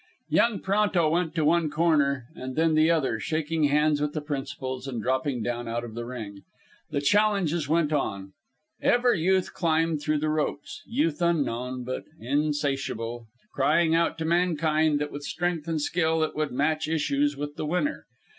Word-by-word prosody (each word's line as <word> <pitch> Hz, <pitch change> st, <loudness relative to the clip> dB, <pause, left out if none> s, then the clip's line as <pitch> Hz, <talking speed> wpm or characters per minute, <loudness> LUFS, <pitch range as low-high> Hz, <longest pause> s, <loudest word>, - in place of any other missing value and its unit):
Young 230 Hz, -4 st, +2 dB
Pronto 195 Hz, -4 st, +2 dB
went 165 Hz, -1 st, 0 dB
to 160 Hz, -3 st, +1 dB
one 165 Hz, 0 st, +3 dB
corner 145 Hz, -5 st, +2 dB
and 130 Hz, -5 st, -7 dB
then 160 Hz, 0 st, +2 dB
the 155 Hz, +1 st, +4 dB
other, 140 Hz, -9 st, +1 dB
shaking 155 Hz, +2 st, 0 dB
hands 150 Hz, +1 st, +2 dB
with 150 Hz, 0 st, -1 dB
the 155 Hz, -, -2 dB
principals 135 Hz, -2 st, -5 dB
and 125 Hz, -3 st, -4 dB
dropping 130 Hz, +1 st, -1 dB
down 120 Hz, 0 st, -3 dB
out 120 Hz, +1 st, -2 dB
of 115 Hz, -2 st, -8 dB
the 120 Hz, +1 st, -5 dB
ring. 105 Hz, -5 st, -7 dB, 0.5 s
The 140 Hz, -2 st, -1 dB
challenges 175 Hz, -3 st, +2 dB
went 155 Hz, -1 st, +2 dB
on. 100 Hz, -9 st, -2 dB, 0.5 s
Ever 245 Hz, 0 st, +3 dB
Youth 185 Hz, +2 st, +1 dB
climbed 165 Hz, -2 st, +1 dB
through 150 Hz, +1 st, 0 dB
the 155 Hz, +1 st, -1 dB
ropes 150 Hz, -2 st, -2 dB
Youth 180 Hz, -, 0 dB
unknown, 130 Hz, -7 st, 0 dB
but 130 Hz, +1 st, -4 dB
insatiable 135 Hz, -4 st, -2 dB, 0.3 s
crying 165 Hz, -2 st, +3 dB
out 165 Hz, 0 st, +2 dB
to 160 Hz, -, -3 dB
mankind 160 Hz, -3 st, +2 dB
that 150 Hz, 0 st, -3 dB
with 145 Hz, -, -6 dB
strength 170 Hz, +1 st, -2 dB
and 165 Hz, -2 st, -1 dB
skill 160 Hz, +1 st, +1 dB
it 155 Hz, -, -2 dB
would 155 Hz, -1 st, -1 dB
match 155 Hz, +4 st, 0 dB
issues 145 Hz, -2 st, 0 dB
with 145 Hz, +1 st, -5 dB
the -, -, -4 dB
winner. 180 Hz, -, -1 dB
150 Hz, 170 wpm, -26 LUFS, 135-165 Hz, 0.5 s, the